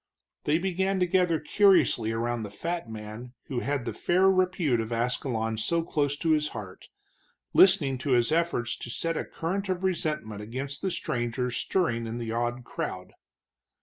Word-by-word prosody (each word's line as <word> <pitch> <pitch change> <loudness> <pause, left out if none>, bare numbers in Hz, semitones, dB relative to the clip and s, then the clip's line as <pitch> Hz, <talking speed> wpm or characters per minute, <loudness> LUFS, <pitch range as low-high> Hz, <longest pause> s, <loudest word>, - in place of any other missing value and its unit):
They 150 +2 +3
began 190 +2 0
to 180 - +3
gather 180 -2 +2
curiously 155 - +4
around 120 +1 -1
the 105 - -5
fat 165 +6 -4
man 110 +3 -8 0.2
who 130 - -1
had 135 -1 -2
the - - -3
fair 185 +2 +3
repute 185 -9 +2
of 110 +1 -3
Ascalon 115 -1 -1
so 165 +9 0
close 145 -3 0
to 160 +2 +1
his 150 -1 +3
heart, 95 -3 -9 0.6
listening 150 -9 +5
to 130 0 0
his 120 +3 +3
efforts 160 -7 +1
to - - -7
set 165 +7 -1
a - - -1
current 190 +4 -3
of 185 0 -1
resentment 150 - -1
against 130 +6 -5
the 195 - 0
stranger 125 -6 -2
stirring 115 -3 0
in 115 +1 -4
the 115 -2 -4
awed 120 +2 -1
crowd. - - -5
140 Hz, 170 wpm, -28 LUFS, 115-175 Hz, 0.6 s, listening